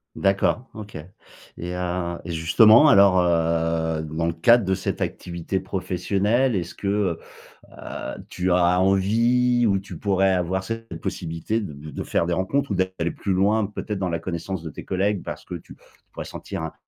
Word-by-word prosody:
D'accord, 100 +6 +1
OK 105 -1 -9 0.6
et 90 +1 -5
heu 90 -1 -2
et 85 - -5
justement 110 - +6
alors, 100 -8 +6
heu, 80 -1 +1
dans 80 +2 -3
le 85 - 0
cadre 115 +7 +4
de 95 - +1
cette 95 0 -3
activité 85 +2 -3
professionnelle, 100 +7 0
est-ce 85 -2 -3
que, 100 -4 -1 0.5
heu, - - -8 0.3
tu 90 +1 -2
as 90 0 +3
envie, 115 +6 +3
ou 100 -2 +3
tu 95 +1 -8
pourrais 95 -1 +2
avoir 90 +1 -1
cette 115 -4 -6
possibilité 85 +8 -3
de 75 -5 -8
de - - -5
faire - - 0
des 85 - -1
rencontres 110 +9 -1
ou - - +1
d'aller 95 -2 -1
plus 95 - -2
loin, 100 +3 +2
peut-être 105 0 -5
dans 95 -2 -1
la 85 -1 -2
connaissance 85 +1 -5
de 80 - -6
tes - - -9
collègues? 95 +1 0
Parce - - -7
que - - -8
tu - - -11 0.3
pourrais - - -7
sentir, 95 -5 -6
un 80 - -5
95 Hz, 175 wpm, -23 LUFS, 85-105 Hz, 0.6 s, justement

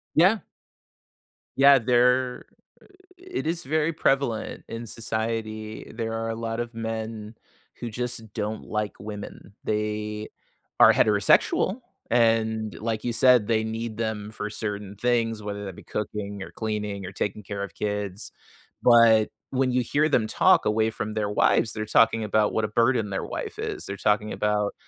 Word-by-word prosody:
Yeah. 190 +7 +5 1.2
Yeah. 140 0 +7
There 125 +1 +2 0.7
It 370 - -5
is 170 +1 -1
very 155 +2 0
prevalent 135 -7 0
in 115 0 -6
society. 110 -1 -4
There 115 -1 -3
are 115 0 -2
a 115 - -2
lot 115 0 -4
of 120 0 -4
men 110 -1 -5 0.4
who 120 - -4
just 120 -1 -4
don't 105 +1 -3
like 105 -1 -3
women. 105 -1 -8
They 105 0 -2 0.5
are - - +8
heterosexual, 110 - +3 0.3
and 110 -2 +2
like 110 0 -2
you 120 - -1
said, 125 -3 +5
they 110 -1 +2
need 110 0 -4
them 110 -2 -3
for 105 -1 -5
certain 105 -1 -5
things, 115 -1 0
whether 100 0 -5
that 95 -2 -7
be - - -12
cooking 100 -1 -4
or - - -10
cleaning 105 -3 -3
or 90 - -6
taking 105 +2 -3
care 100 0 -5
of 100 -4 -7
kids. 105 -1 -3 0.5
But, 115 -3 +6 0.2
when 130 -1 +1
you 125 0 +2
hear 150 +6 +1
them 120 -7 +2
talk - - +4
away 110 +1 +2
from 110 -1 -4
their 105 -1 -1
wives, 110 +2 +2
they're 110 0 -3
talking 115 +1 +3
about 105 0 +1
what 110 - +1
a - - -1
burden 115 -1 +1
their 95 - -2
wife - - -6
is. - - -4
They're 100 - -5
talking 105 +1 +1
about 105 -1 0
110 Hz, 160 wpm, -25 LUFS, 105-115 Hz, 1.2 s, are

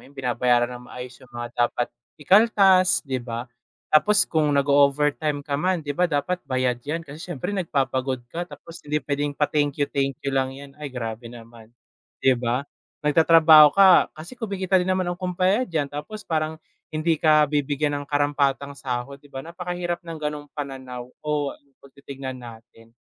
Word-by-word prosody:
yun, 140 - -19
binabayaran 125 -1 +1
ng 125 - -15
maayos 125 -1 -9
yung 130 - -17
mga 120 0 -5 0.2
dapat 120 0 -3 0.3
ikaltas, 190 +1 +4
di 130 -2 -2
ba? 120 0 -5 0.5
Tapos 210 +7 +5
kung 155 -2 +1
nag-o-overtime 145 +1 +2
ka 140 -1 -2
man, 180 -3 0
di 145 - -2
ba 180 +4 +1
dapat 170 +4 -1
bayad 130 -2 0
'yan, 160 +6 -4
kasi 145 +2 -11
siyempre 175 0 -5
nagpapagod 135 -8 -1
ka, 175 +1 -4
tapos 165 - -12
hindi 150 +1 0
puwedeng 145 0 -2
pa-thank 145 -1 0
you, 145 - +2
thank 135 -1 -1
you 140 - 0
lang 135 0 0
'yan. 140 0 -11
Ay, 150 - -4
grabe 115 -2 -6
naman. 115 -1 -13 0.5
Di 130 - +5
ba? 120 +3 -1 0.4
Nagtatrabaho 155 -1 +7
ka 190 -2 +7
kasi 170 +11 -11
kumikita 195 -4 0
din 180 - -2
naman 185 0 +1
ang 175 - -5
kumpanya 185 +6 +1
diyan, 155 -5 -2
tapos 210 +9 -7
parang 160 -1 -1 0.4
hindi 160 +1 +1
ka 155 -1 +5
bibigyan 145 0 0
ng 145 - -7
karampatang 145 -1 0
sahod. 130 +2 -4
Di 145 - -19
ba 135 -1 -7
napakahirap 175 0 -4
ng 165 - -6
gano'ng 150 -1 -5
pananaw 130 -3 -6 0.2
o 150 -2 -1 0.3
'pag 140 - -17
titignan 135 -2 -8
natin. 115 -1 -14
145 Hz, 170 wpm, -24 LUFS, 130-165 Hz, 0.5 s, Nagtatrabaho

